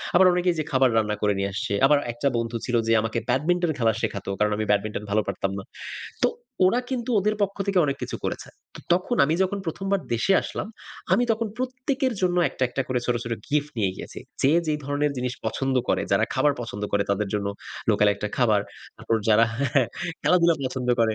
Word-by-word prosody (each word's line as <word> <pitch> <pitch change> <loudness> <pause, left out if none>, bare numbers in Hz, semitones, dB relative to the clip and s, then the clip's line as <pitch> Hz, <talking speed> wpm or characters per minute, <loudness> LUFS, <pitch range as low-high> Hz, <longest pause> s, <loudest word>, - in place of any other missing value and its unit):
আবার 185 +1 +7
অনেকেই 180 -1 +1
যে - - +1
খাবার 130 -1 +4
রান্না 105 -1 +1
করে 105 -1 +3
নিয়ে 100 0 -1
আসছে। 100 - -2
আবার 145 +1 +5
একটা 120 +4 -1
বন্ধু 115 0 -2
ছিল 125 - -1
যে 115 - +4
আমাকে 115 +1 -1
ব্যাডমিন্টন 165 +6 +2
খেলা 115 -1 +3
শেখাতো। 100 -1 -3
কারণ 105 0 +2
আমি 110 - -1
ব্যাডমিন্টন 105 +1 0
ভালো 110 +1 +3
পারতাম 95 0 -2
না। - - -7 0.6
তো - - +6 0.4
ওরা 240 +7 +3
কিন্তু 250 -1 -2
ওদের 210 +2 +1
পক্ষ 200 0 -1
থেকে 195 -2 +2
অনেক 140 - -1
কিছু - - -3
করেছে। - - -3 0.3
অ - - -8
তখন 185 +7 +1
আমি 155 +3 +1
যখন 200 +2 -1
১ম 195 +4 -4
বার 200 - +2
দেশে 155 +12 +2
আসলাম, 215 - -5 0.4
আমি 240 +6 +4
তখন 225 +1 -1
প্রত্যেকের 255 +1 -1
জন্য 180 -1 +2
একটা, - - -6
একটা 135 +2 -2
করে 125 -1 0
ছোট, 125 - +2
ছোট 120 - -3 0.2
গিফট 150 0 +1
নিয়ে 100 -3 +2
গিয়েছি। - - -8 0.2
যে 135 - +5 0.2
যে 155 - +1
ধরনের 145 +1 0
জিনিস 125 0 -2
পছন্দ 135 +4 -1
করে, - - +2
যারা - - +4
খাবার 145 -1 +3
পছন্দ 110 -3 -6
করে 100 0 +3
তাদের 100 +1 0
জন্য 100 -1 -1 0.4
লোকাল 105 0 +4
একটা 105 - -4
খাবার, 110 -5 +3 0.4
তারপর 115 - -1
হ্যাঁ, 110 -1 -5
যারা 110 +2 +6 0.8
খেলাধুলা 170 -2 +4
পছন্দ 130 -1 -3
করে 110 -1 +3
130 Hz, 205 wpm, -25 LUFS, 110-180 Hz, 0.8 s, আবার